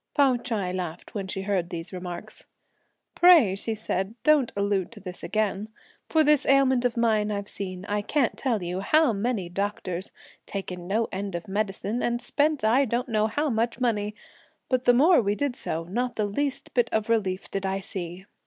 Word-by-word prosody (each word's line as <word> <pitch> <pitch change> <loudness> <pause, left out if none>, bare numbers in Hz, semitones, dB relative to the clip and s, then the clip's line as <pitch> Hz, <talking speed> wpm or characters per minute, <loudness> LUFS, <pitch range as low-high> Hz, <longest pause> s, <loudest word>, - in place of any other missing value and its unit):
Pao 275 -3 +5
Ch'ai 220 -7 -2
laughed 180 -2 -5
when 195 -3 -3
she 190 0 -4
heard 190 -4 -1
these 170 +1 -6
remarks. 180 +3 -7 0.7
"Pray," 335 - +7
she 220 +3 -3
said, 205 -1 -3
"don't 295 -6 +4
allude 200 -2 0
to - - -11
this 180 -1 -8
again; 215 -1 -1 0.4
for 320 -1 +4
this 300 -2 +4
ailment 265 -2 +4
of 245 -1 0
mine 220 -3 +2
I've 200 -1 -3
seen, 185 -2 -6
I 205 0 -1
can't 255 +3 +1
tell 230 -8 -1
you, 175 +2 -3
how 305 +5 +3
many 205 -2 -1
doctors; 185 0 -3 0.4
taken 180 -3 -5
no 220 +4 +1
end 195 -1 -4
of 170 - -5
medicine 205 +3 -2
and 240 0 0
spent 290 +1 0
I 235 +6 +4
don't 245 0 -1
know 215 -1 +2
how 290 +6 -1
much 230 +2 0
money; 210 -4 0 0.5
but 255 -1 +1
the 245 - +6
more 315 +4 +6
we 205 -1 0
did 280 +1 -1
so, 165 +1 -3
not 240 +8 -2
the 215 - 0
least 270 +7 -2
little 240 -2 +3
bit - - +3
of 215 0 -4
relief 195 -5 0
did 195 0 -2
I 190 0 -1
see. 185 -1 -6
210 Hz, 190 wpm, -26 LUFS, 190-245 Hz, 0.7 s, Pray